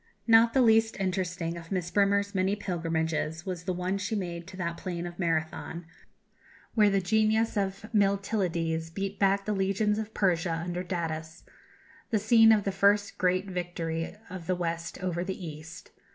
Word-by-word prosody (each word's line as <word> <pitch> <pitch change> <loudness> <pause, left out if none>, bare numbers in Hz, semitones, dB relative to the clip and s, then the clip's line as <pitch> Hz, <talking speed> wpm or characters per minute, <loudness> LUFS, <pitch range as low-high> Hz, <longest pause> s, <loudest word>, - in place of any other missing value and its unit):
Not 230 +1 +5
the 260 - +5
least 225 -1 +4
interesting 180 -3 -2
of 165 -1 -11
Miss 180 -2 -2
Bremer's 200 0 +2
many 190 +1 +1
pilgrimages 165 -3 -2
was 180 -3 -5
the 185 - 0
one 180 +2 -2
she 220 - -2
made 175 -4 -4
to 190 -1 -10
that 170 -2 -2
plain 175 -1 -4
of 175 +1 -8
Marathon, 165 0 -2 0.9
where 210 -2 +5
the 195 0 +2
genius 220 +4 +2
of 195 0 -2
Miltiades 190 -5 0
beat 195 +3 -4
back 195 0 +2
the 215 - 0
legions 200 +2 +1
of 220 0 -6
Persia 175 -3 +1
under 175 0 -3
Datis 165 -3 -4 0.7
the 225 - +2
scene 225 +1 +6
of 215 -2 +4
the 195 - -1
first 200 +1 +2
great 185 0 +2
victory 170 -2 -3
of 180 -3 -8
the 185 - +1
West 165 -1 -3
over 175 -1 -1
the 190 +1 -4
East. 160 +2 -9
185 Hz, 165 wpm, -28 LUFS, 170-200 Hz, 0.9 s, scene